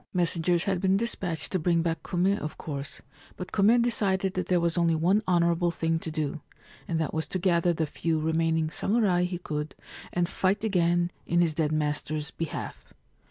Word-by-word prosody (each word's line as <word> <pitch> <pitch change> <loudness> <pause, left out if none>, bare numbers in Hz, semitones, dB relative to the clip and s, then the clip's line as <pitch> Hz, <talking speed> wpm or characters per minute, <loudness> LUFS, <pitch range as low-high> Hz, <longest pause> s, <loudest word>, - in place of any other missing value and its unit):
Messengers 175 0 +2
had 190 -3 -1
been 190 0 +3
despatched 195 -7 -2
to 185 - 0
bring 170 0 +2
back 165 -1 -1
Kume, 185 +3 +1
of 155 - -6
course; 140 -2 -6 0.3
but 180 0 -7
Kume 220 +4 +4
decided 195 -5 +1
that 185 - -2
there 180 -1 +3
was 170 -1 +1
only 170 -2 +2
one 180 +7 +3
honourable 170 -1 +2
thing 165 -1 -1
to 165 - -5
do, 155 -1 -3 0.5
and 165 -2 -1
that 160 - -2
was 160 0 -2
to - - -2
gather 175 -1 +2
the 160 -1 0
few 160 +2 -1
remaining 160 0 +1
samurai 195 -5 +1
he 180 0 -3
could 150 -3 -4 0.4
and 175 -1 0
fight 190 +3 0
again 175 -4 +2 0.2
in 170 - +2
his 170 -2 +3
dead 155 -1 0
master's 150 0 -2
behalf. 165 -2 -6
170 Hz, 185 wpm, -27 LUFS, 160-185 Hz, 0.5 s, Kume